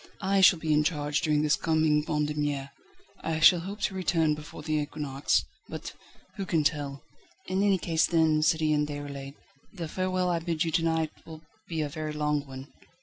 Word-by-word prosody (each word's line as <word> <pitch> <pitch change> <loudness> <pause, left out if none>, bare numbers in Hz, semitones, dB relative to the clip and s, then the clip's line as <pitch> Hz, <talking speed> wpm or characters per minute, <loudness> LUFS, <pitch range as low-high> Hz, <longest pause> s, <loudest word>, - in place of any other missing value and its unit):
I 195 0 +2
shall 190 -1 +7
be 160 -1 0
in 150 0 +4
charge 150 -2 0
during 150 -1 +2
this 150 -1 +3
coming 155 -2 +2
Vendémiaire. 150 -2 -1 0.5
I 160 -1 -1
shall 170 +2 +7
hope 195 +5 -7
to 195 - 0
return 170 -4 +1
before 150 0 -9
the 155 0 -2
equinox, 145 -2 -1 0.2
but - - -6 0.4
who 195 - -3
can 160 -3 +1
tell?" 145 -2 -1 0.4
"In 185 +1 -1
any 200 -1 +3
case 165 -2 +1
then, 160 -2 +3
Citoyen 155 -1 +2
Déroulède, 140 -1 -7 0.4
the 170 -5 -6
farewell 185 +1 -1
I 170 - +1
bid 165 -1 -1
you 165 - -2
to 165 +1 +1
night 160 -1 0
will 160 -1 -11 0.2
be 165 -2 -2
a - - -2
very 155 +1 -5
long 150 -1 -1
one." 135 +1 -10
155 Hz, 185 wpm, -28 LUFS, 150-165 Hz, 0.5 s, shall